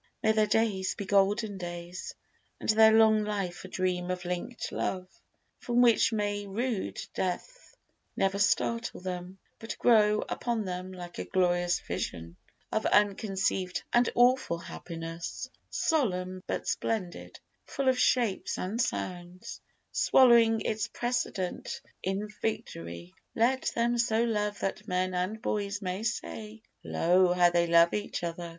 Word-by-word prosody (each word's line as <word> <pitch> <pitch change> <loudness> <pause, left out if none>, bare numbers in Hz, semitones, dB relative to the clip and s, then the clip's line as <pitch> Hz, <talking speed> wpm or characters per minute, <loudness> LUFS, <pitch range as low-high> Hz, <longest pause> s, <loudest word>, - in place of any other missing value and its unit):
May 220 - +4
their 215 -1 +2
days 205 -5 +1
be 200 - -5
golden 200 +1 +2
days, 175 0 -6 0.4
And - - -6
their 220 0 +7
long 220 -1 +5
life 200 -4 -3
a - - -6
dream 185 -1 -1
of 180 -1 -3
linked 180 +8 -4
love, 185 -1 -2 0.5
From 245 0 +2
which 235 -1 +4
may 205 -2 -2
rude 200 - -2
Death 345 - -4 0.4
never 195 +1 +1
startle 230 +3 +1
them, 180 0 -5 0.2
But 225 - -6
grow 215 -3 +4
upon 235 -3 -2
them 185 0 -5
like 175 -1 -9
a - - -2
glorious 175 -1 +1
vision 85 +1 -5 0.4
Of 220 - 0
unconceived 195 -2 +1
and 240 0 +4
awful 245 -7 +3
happiness, 165 0 -6 0.2
Solemn 185 - 0
but - - -3
splendid, 185 -6 -3 0.3
full 275 -1 -2
of 260 -1 +3
shapes 235 -8 +1
and 210 +6 -2
sounds, 180 -5 -4 0.3
Swallowing 235 -3 +5
its 215 0 -1
precedent 240 -7 -3 0.2
in 195 +3 -2
victory. 85 - -4 0.2
Let 255 +4 +2
them 235 +1 +1
so 230 -1 +2
love 210 -3 -1
that 205 +2 -3
men 185 -1 0
and 185 +5 -2
boys 205 -3 -2
may 185 0 -3
say, 225 -1 -4 0.2
Lo! 180 +1 +3
how 175 -1 +4
they 170 0 +2
love 170 0 +5
each 210 -3 -3
other! 170 0 -4
200 Hz, 135 wpm, -29 LUFS, 180-225 Hz, 0.5 s, their